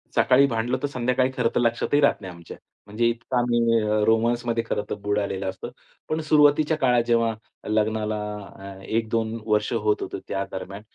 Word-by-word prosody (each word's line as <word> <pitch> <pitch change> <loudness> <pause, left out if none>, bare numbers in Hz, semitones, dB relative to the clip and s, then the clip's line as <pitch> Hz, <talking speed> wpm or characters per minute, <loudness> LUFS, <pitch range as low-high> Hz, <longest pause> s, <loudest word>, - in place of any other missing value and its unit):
सकाळी 130 +2 +5
भांडलो 120 +1 -1
तर 145 - 0
संध्याकाळी 125 -1 0
खरंतर 120 -1 +1
लक्षातही 120 +4 +1
राहत 140 - +3
नाही 95 -3 -8
आमच्या. 85 -1 -11 0.3
म्हणजे 110 +3 0
इतकाही 120 -1 +1 0.3
रोमान्समध्ये 115 +1 +1
खरं 105 - -1
तर - - -2
बुडालेलं 100 -2 -1
असतं. 95 +5 -7 0.4
पण 155 - -1
सुरुवातीच्या 150 0 +3
काळात 125 -5 +3
जेव्हा 115 -1 +2 0.4
लग्नाला 110 0 0 0.4
अ, 95 0 -10
1-2 115 0 -1
वर्ष 105 -1 +1
होत 105 -2 0
होते - - -5
त्या 100 0 -2
दरम्यान. 100 +2 -7
115 Hz, 155 wpm, -24 LUFS, 105-125 Hz, 0.4 s, सकाळी